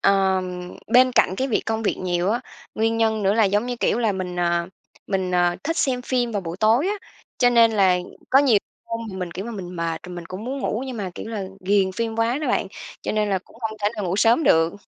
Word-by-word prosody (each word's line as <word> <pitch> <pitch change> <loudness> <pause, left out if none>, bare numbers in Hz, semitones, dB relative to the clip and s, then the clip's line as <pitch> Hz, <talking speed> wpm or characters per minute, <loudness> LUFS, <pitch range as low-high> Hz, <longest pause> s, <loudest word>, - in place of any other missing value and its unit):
Ờm, 185 -2 +1 0.2
bên 255 +1 +6
cạnh 185 - +3
cái 265 +5 -1
việc 235 - +1
công 220 0 -1
việc 215 - 0
nhiều 180 +1 0
á, 235 +3 0 0.3
nguyên 225 +1 +1
nhân 220 -1 +1
nữa 195 0 +3
là, 225 - +4
giống 205 +4 +1
như 250 -1 -3
kiểu 230 - +1
là, 225 -4 +2
mình, 185 -1 -4
à, 170 -1 +1 0.4
mình, 190 -2 -1
à, 175 0 +2
thích 330 +3 -1
xem 255 -5 0
phim 245 -2 0
vào 205 - -1
buổi 170 0 -5
tối 230 - +4
á. 410 - 0 0.4
Cho 245 - +5
nên 230 -1 +5
là 190 -4 +4 0.3
có 265 - +7
nhiều 265 -7 +5 0.3
hôm 230 0 -4
thì 190 - -7
mình, 180 -2 -4
kiểu 185 +3 -5
mà, 235 - -5
mình 180 -4 -7
mệt 165 -1 -2
rồi 180 - -8
mình 175 -1 -7
cũng 185 +5 -7
muốn 265 +3 -3
ngủ, 245 -3 -2
nhưng 255 -2 -5
mà, 195 -4 -4
kiểu - - -7
là, 215 -3 -3 0.2
ghiền 190 0 +2
phim 225 +3 -3
quá 230 +3 +1
đó 300 -3 -2
bạn, - - +1 0.4
cho - - -2
nên 215 -1 +1
là 190 - +2
cũng 185 - -21
hông 220 -2 -4
thể 205 - +4
nào 210 - -2
ngủ 180 +1 -1
sớm 230 +9 +4
được. 165 +2 +4
210 Hz, 260 wpm, -23 LUFS, 185-230 Hz, 0.4 s, có